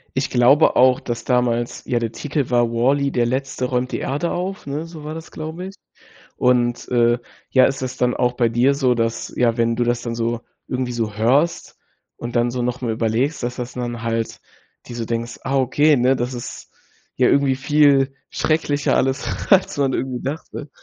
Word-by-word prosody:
Ich 130 +1 0
glaube 130 +5 +4
auch, 130 0 +5
dass 120 -1 -5
damals 120 -1 0
ja, 120 - 0
der 115 -1 -1
Titel 145 -1 -3
war: 120 -1 +3
„WALL-E, 135 +4 +1
der 120 -1 +1
Letzte 130 +1 -2
räumt 125 0 -1
die - - -1
Erde 145 +5 -2
auf“, 190 +3 -4
ne, 150 +4 -3
so 160 -3 -10
war 155 - -5
das, 165 +1 -9
glaube 160 +4 -6
ich. 195 - -10 0.6
Und, 120 -1 +1
äh, 120 -1 +3 0.3
ja, 130 -1 +5
ist 135 0 -1
das 130 0 -4
dann 125 0 +1
auch 125 0 +1
bei 120 -2 +2
dir 120 +5 +3
so, 130 -3 +2
dass 115 -1 -2
ja, 115 -1 +2
wenn 115 0 +1
du 120 - +1
das 120 0 0
dann 115 -1 -3
so 115 0 -1 0.3
irgendwie 125 -1 -2
so 115 -3 -2
hörst 135 +10 +1 0.4
und 120 0 -4
dann 120 +1 +2
so 125 0 -3
noch 125 0 -2
mal 120 -3 -2
überlegst, 115 +6 -1
dass 120 +1 -3
dass 125 0 -5
dann 120 -2 -4
halt 115 -1 -2 0.5
dir 120 - -8
so 120 - -3
denkst: 115 +1 -4
„Ah 135 +1 0
okay, 145 +3 +3
ne, 125 +2 +3
das 125 +1 -2
ist 120 -1 -8 0.5
ja - - +4
irgendwie 140 -1 +3
viel 140 -1 +3 0.2
schrecklicher 150 -3 0
alles, 135 +1 0 0.3
als 185 -6 +4
man 140 -2 +2
irgendwie 130 -1 -3
dachte.“ 145 +1 -6
125 Hz, 200 wpm, -21 LUFS, 120-140 Hz, 0.6 s, auch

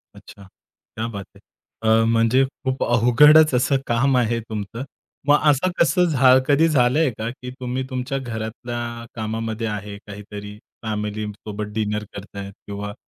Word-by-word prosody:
अच्छा. 100 - -14 0.5
क्या 110 +1 -2
बात 100 -4 -6
है - - -16 0.4
अ, 110 0 +4
म्हणजे 115 +3 +3
खूप 130 -1 -4
अवघडच 135 +6 +6
असं 135 +2 +2
काम 130 +3 +2
आहे 115 -1 +1
तुमचं. 110 +2 -6 0.4
मग 145 0 +6
असं 145 +6 +2
कसं 180 +1 +4
झा 130 -5 +5
कधी 150 +3 +4
झालंय 145 +1 +3
का, 110 +1 -3
की 125 +1 -8
तुम्ही 125 +1 -3
तुमच्या 130 +1 -3
घरातल्या 120 0 -5
कामामध्ये 110 +1 -3
आहे 105 -1 -5
काहीतरी, 105 0 -9 0.3
फॅमिलीसोबत 105 0 -4
डिनर 105 -1 -1
करताय 100 0 -8
किंवा 100 +1 -7
115 Hz, 140 wpm, -22 LUFS, 105-130 Hz, 0.5 s, अवघडच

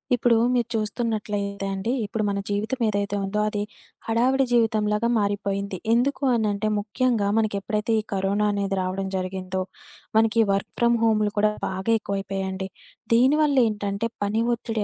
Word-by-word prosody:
ఇప్పుడు 240 -1 +3 0.2
మీరు 240 -2 +1
చూస్తున్నట్లయితే 210 -2 -2
అండి. 195 +4 -2
ఇప్పుడు 215 +2 -2
మన 200 0 -1
జీవితం 215 +5 -1
ఏదైతే 205 -1 -1
ఉందో 210 +2 -2
అది 210 -1 -2 0.5
హడావిడి 255 +4 +2
జీవితంలాగా 215 -1 +2
మారిపోయింది. 200 -1 -1 0.2
ఎందుకు 265 +3 +1
అనంటే 215 -2 0
ముఖ్యంగా 220 0 0
మనకెప్పుడైతే 210 +1 0
ఈ - - -1
కరోనా 195 +2 +1
అనేది 200 -1 -1
రావడం 185 +1 -2
జరిగిందో, 185 0 -3 0.6
మనకి 225 0 +3
ఈ - - 0
వర్క్ 195 - -2
ఫ్రమ్ 235 0 +4
హోములు 215 -2 +2
కూడా 210 +1 +3 0.2
బాగా 190 +4 -2
ఎక్కువైపోయాయండి. 195 -1 -3 0.5
దీనివల్లెంటంటే 230 -6 +2
పని 210 +3 0
ఒత్తిడి 225 -2 -3
210 Hz, 135 wpm, -24 LUFS, 200-230 Hz, 0.6 s, ఫ్రమ్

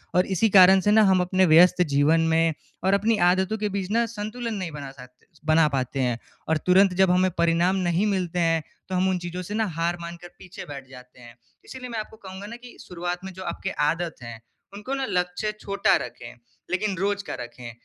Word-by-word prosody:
और 180 +1 +4
इसी 225 +4 +2
कारण 190 +1 +8
से 205 - +2
ना 220 +1 +6
हम 185 -1 +3
अपने 185 +1 +2
व्यस्त 180 +2 +6
जीवन 150 +4 +3
में 165 0 +2 0.3
और 190 +1 +2
अपनी 215 +3 +2
आदतों 190 +4 0
के 210 -1 -2
बीच 195 -1 -4 0.2
संतुलन 230 +2 -5
नहीं 185 -4 -4
बना 145 -2 -7
साते 125 -2 -16 0.2
बना 155 0 +4
पाते 130 +1 -3
हैं। 125 -2 0 0.3
और 160 - +3
तुरंत 185 +1 +5
जब 190 -1 +4
हमें 185 +1 +3
परिणाम 170 +2 +2
नहीं 175 +4 +1
मिलते 180 -3 -1
हैं, 165 -2 +1 0.3
तो 185 - -2
हम 185 +1 +2
उन 185 - 0
चीज़ों 175 +1 -6
से 180 +3 -7
ना 220 0 +1
हार 170 +1 0
मानकर 170 +1 -8
पीछे 185 0 -10
बैठ 135 -2 -9
जाते 125 -1 -15
हैं। 120 -1 -14 0.3
इसीलिए 255 -1 -9
मैं 230 -2 -4
आपको 215 +1 -8
कहूँगा 190 0 -9
ना 230 - -8
कि 245 - -13
शुरुआत 175 +1 -5
में 190 - -7
जो 185 +1 -9
आपके 190 - -4 0.2
आदत 170 0 -4
है, 115 -1 -8 0.3
उनको 210 +7 -6
ना 270 -1 -2
लक्ष्य 180 +4 -1
छोटा 200 0 +2
रखें, 125 - -11 0.4
लेकिन 195 +2 -1
रोज़ 200 +2 -1
का - - -4
रखें। 120 0 -8
180 Hz, 210 wpm, -24 LUFS, 165-200 Hz, 0.4 s, कारण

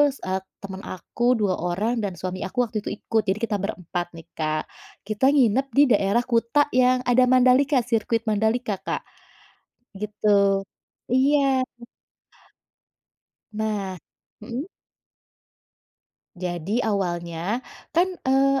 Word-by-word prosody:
sa 190 -7 -2 0.2
temen 195 -1 -7
aku 185 +5 -6 0.2
2 200 -3 +2
orang 180 +7 -1
dan 200 -2 -2
suami 185 0 -4
aku 220 - -16
waktu 220 -1 -5
itu - - -2
ikut, 220 +1 0
jadi 195 +3 +1
kita 215 -2 -1
ber-4 180 -4 -3
nih, 165 -1 -12
Kak. 155 -1 -1 0.4
Kita 215 +4 0
nginep 260 -2 +3
di 285 - +8
daerah 200 +2 +3
Kuta 245 +4 +2
yang 255 0 +4
ada 250 +1 +5
Mandalika 255 +2 +5
sirkuit 230 -1 0
Mandalika, 220 +1 +1
Kak, 195 - -3 1.0
gitu, 200 -1 +2 0.5
iya. 270 0 +3 1.9
Nah 210 -3 -3 0.4
mhm. 240 +7 -5 1.7
Jadi 180 +6 -2
awalnya, 180 +2 -2 0.3
kan, 355 +2 +4 0.2
eee, 270 +1 +4
215 Hz, 115 wpm, -24 LUFS, 190-250 Hz, 1.9 s, di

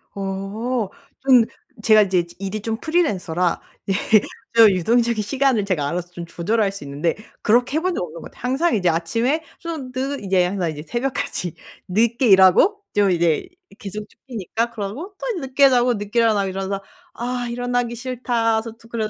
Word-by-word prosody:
어. 200 +4 -3 0.3
좀 255 -3 +6 0.4
제가 215 -1 +6
이제 185 -3 +1
지 170 - -16
일이 200 +2 -4
좀 225 0 -2
프리랜서라 190 - 0 0.3
예 195 - +3 0.6
좀 225 -2 +9
유동적인 230 +4 +2
시간을 260 -1 +1
제가 160 -8 0
알아서 175 +3 -3
좀 175 -1 -7
조절할 195 +5 0
수 195 -6 -9
있는데 145 +4 -1 0.3
그렇게 245 +6 +3
해 320 - 0
본 365 0 0
적 - - -2
없는 165 -1 -8
것 - - -10
같아요. - - -19
항상 270 +8 +1
이제 180 -4 +2
아침에 230 - 0 0.2
좀 315 -7 -6
늘 265 -1 -3
이제 190 -2 +3
항상 180 -3 -1
이제 150 -1 -7
새벽까지 240 - -3 0.4
늦게 235 +6 +2
일하고 195 - +6
좀 200 -2 +4
이제 170 -3 +1 0.2
이 - - -18
계속 210 +1 -6
쫓기니까 230 -1 -4
그러고 235 - -6
또 480 -7 -2
늦게 270 +1 +4
자고 245 -1 +3
늦게 205 +2 -5
일어나고 210 -4 +3
이러면서 195 +1 -3 0.3
'아 245 0 -3
일어나기 245 0 -1
싫다.' 235 -2 0
저 230 - -7
또 230 0 -18
그래서 220 -2 -2
220 Hz, 355 characters per minute, -21 LUFS, 190-250 Hz, 0.6 s, 좀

